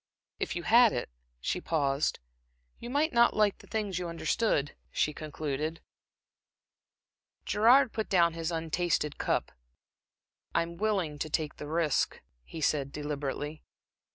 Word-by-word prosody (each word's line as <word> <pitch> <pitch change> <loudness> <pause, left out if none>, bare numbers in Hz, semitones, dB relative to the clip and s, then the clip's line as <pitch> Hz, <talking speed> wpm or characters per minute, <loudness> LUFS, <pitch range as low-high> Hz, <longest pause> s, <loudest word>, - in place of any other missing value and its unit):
If - - -2
you 175 - -3
had 235 +2 +6
it" 120 - -3 0.3
She 180 - -1
paused. 145 -3 0 0.6
"You 240 - -7
might 290 +4 +1
not 235 0 +5
like 210 -2 +2
the - - -16
things 205 -5 -2
you 180 - -3
understood," 165 -3 0
she 150 - 0
concluded. 155 +1 -4 1.7
Gerard 245 +4 +5
put 220 -1 -3
down 170 -4 +4
his 165 0 -3
untasted 165 -2 -1
cup. - - 0 1.0
"I'm 170 0 0
willing 190 -8 0
to 155 - -2
take 155 0 -2
the 150 - -7
risk," 160 -2 +1 0.2
he 160 - -8
said, 140 -2 +1
deliberately. 150 +1 -4
165 Hz, 130 wpm, -30 LUFS, 150-210 Hz, 1.7 s, had